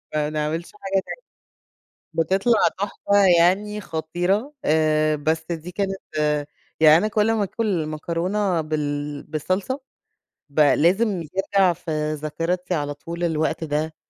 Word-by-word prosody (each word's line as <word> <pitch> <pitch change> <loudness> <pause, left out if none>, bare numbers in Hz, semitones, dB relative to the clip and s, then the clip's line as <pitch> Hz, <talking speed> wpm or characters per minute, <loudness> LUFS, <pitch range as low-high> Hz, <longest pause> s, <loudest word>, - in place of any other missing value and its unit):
ما 150 -1 +1
نعملش 155 +2 -3
حاجه 195 - -6
تانية. - - -7 0.9
بتطلع 195 +8 +3
تحفة، 200 0 0 0.2
يعني 205 +5 +2
خطيرة. 175 - -1
آآ 155 0 +3
بس 160 +2 -1
دي 170 +1 -5
كانت 195 +1 -2 0.8
يعني 155 0 +8
أنا 205 +5 +1
كلّ 215 +1 +2
ما 215 -2 +1
آكل 195 -5 -1
مكرونة 170 +4 -1
بال 145 -1 -3
بالصلصة، 185 - -2 0.7
ب 145 +2 -1
لازم 180 +7 +3
ترجع 190 +3 +1
في 155 -3 -3
ذاكرتي 170 +4 -2
على 145 -2 -2
طول 170 +4 -5
الوقت 160 0 0
ده. 155 +1 -2
165 Hz, 125 wpm, -23 LUFS, 155-195 Hz, 0.9 s, يعني